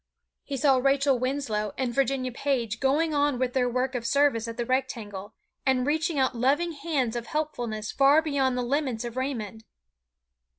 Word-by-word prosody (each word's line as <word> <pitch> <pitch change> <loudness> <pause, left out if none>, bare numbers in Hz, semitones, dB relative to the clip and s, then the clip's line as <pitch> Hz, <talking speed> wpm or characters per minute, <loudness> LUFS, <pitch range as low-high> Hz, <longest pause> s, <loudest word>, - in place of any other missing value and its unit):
He 275 - -4
saw 270 0 +4
Rachel 275 0 +2
Winslow 240 -6 -2
and 255 -3 -1
Virginia 265 -1 0
Page 240 -4 -1
going 300 +4 +2
on 290 -2 +2
with 250 0 -1
their 250 -2 +2
work 255 +2 -1
of 245 -2 -3
service 240 -2 +2
at 230 -1 -6
the 240 - -2
Rectangle, 225 -6 -3 0.3
and 260 -2 +2
reaching 315 +2 0
out 260 -1 +2
loving 280 +8 +1
hands 285 -7 -2
of 235 -1 -4
helpfulness 240 -9 -3
far 275 +2 +5
beyond 270 -4 0
the 250 - 0
limits 255 -3 -1
of 235 0 -6
Raymond. 230 -5 -4
260 Hz, 170 wpm, -27 LUFS, 235-280 Hz, 0.3 s, far